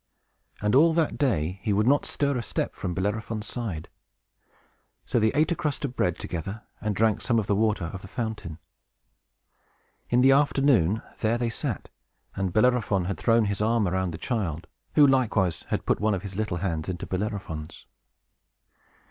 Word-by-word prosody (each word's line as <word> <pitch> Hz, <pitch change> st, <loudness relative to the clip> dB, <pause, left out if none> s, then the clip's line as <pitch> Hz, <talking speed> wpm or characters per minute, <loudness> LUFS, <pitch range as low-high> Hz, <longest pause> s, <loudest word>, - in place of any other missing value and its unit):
And 105 Hz, -, +2 dB
all 160 Hz, +5 st, +6 dB
that 160 Hz, -2 st, 0 dB
day 95 Hz, -, 0 dB
he 110 Hz, -, -1 dB
would 105 Hz, +2 st, +2 dB
not 140 Hz, +3 st, +3 dB
stir 140 Hz, -1 st, 0 dB
a 125 Hz, -, -1 dB
step -, -, -3 dB
from 90 Hz, -2 st, -4 dB
Bellerophon's 105 Hz, +3 st, -2 dB
side; 105 Hz, -9 st, -5 dB, 1.2 s
so -, -, +1 dB
they 110 Hz, 0 st, +3 dB
ate 155 Hz, +4 st, +2 dB
a -, -, +2 dB
crust 150 Hz, -4 st, -2 dB
of 130 Hz, -2 st, -5 dB
bread 90 Hz, -2 st, +1 dB
together, 95 Hz, +5 st, -5 dB, 0.2 s
and 105 Hz, -2 st, -1 dB
drank 110 Hz, +1 st, +2 dB
some 120 Hz, -2 st, +1 dB
of 110 Hz, -, +1 dB
the 105 Hz, -, +1 dB
water 105 Hz, -3 st, +1 dB
of 95 Hz, -, -6 dB
the -, -, -10 dB
fountain. 110 Hz, -, -4 dB, 1.5 s
In 120 Hz, +1 st, +4 dB
the 135 Hz, +1 st, +6 dB
afternoon, 135 Hz, -, +3 dB, 0.2 s
there 115 Hz, +1 st, +1 dB
they 120 Hz, -1 st, -1 dB
sat, -, -, -3 dB, 0.5 s
and 95 Hz, -2 st, -1 dB
Bellerophon 110 Hz, -3 st, +2 dB
had 100 Hz, +1 st, -3 dB
thrown 115 Hz, -1 st, +3 dB
his 100 Hz, 0 st, -2 dB
arm 110 Hz, -1 st, +2 dB
around 95 Hz, 0 st, 0 dB
the 80 Hz, -, -5 dB
child, 85 Hz, -8 st, -2 dB, 0.3 s
who 150 Hz, -, +8 dB
likewise 115 Hz, -, +2 dB
had -, -, -2 dB
put -, -, +1 dB
one 105 Hz, -1 st, +2 dB
of 90 Hz, -, -5 dB
his 100 Hz, -2 st, -7 dB
little 105 Hz, -4 st, -1 dB
hands 85 Hz, -3 st, -2 dB
into 90 Hz, -1 st, -4 dB
Bellerophon's. 95 Hz, -6 st, -4 dB
105 Hz, 175 wpm, -26 LUFS, 95-120 Hz, 1.5 s, who